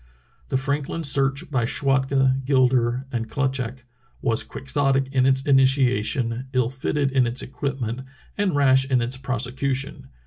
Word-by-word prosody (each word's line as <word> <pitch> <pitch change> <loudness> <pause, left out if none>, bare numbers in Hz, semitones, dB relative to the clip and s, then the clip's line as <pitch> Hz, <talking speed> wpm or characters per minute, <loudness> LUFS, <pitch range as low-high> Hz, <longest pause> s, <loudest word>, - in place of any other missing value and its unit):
The - - 0
Franklin 140 +4 -2
Search 140 +2 0
by 130 -4 +1
Schwatka, 135 +1 +1
Gilder 130 -2 +2
and 115 -2 -3
Klut 135 +1 0
schak 125 -1 -4 0.4
was 115 -1 +1
quixotic 135 -1 -1
in 130 -1 +3
its 135 0 +2
initiation, 130 -3 +2
ill 125 -2 +1
fitted 135 +1 -2
m 130 -2 +4
its 120 +2 -1
equipment, 130 -3 -4 0.3
and 200 -6 0
rash 130 -2 +4
in 130 -2 +3
its 120 +3 -1
prosecution. 130 +1 -2
130 Hz, 140 wpm, -23 LUFS, 125-135 Hz, 0.4 s, m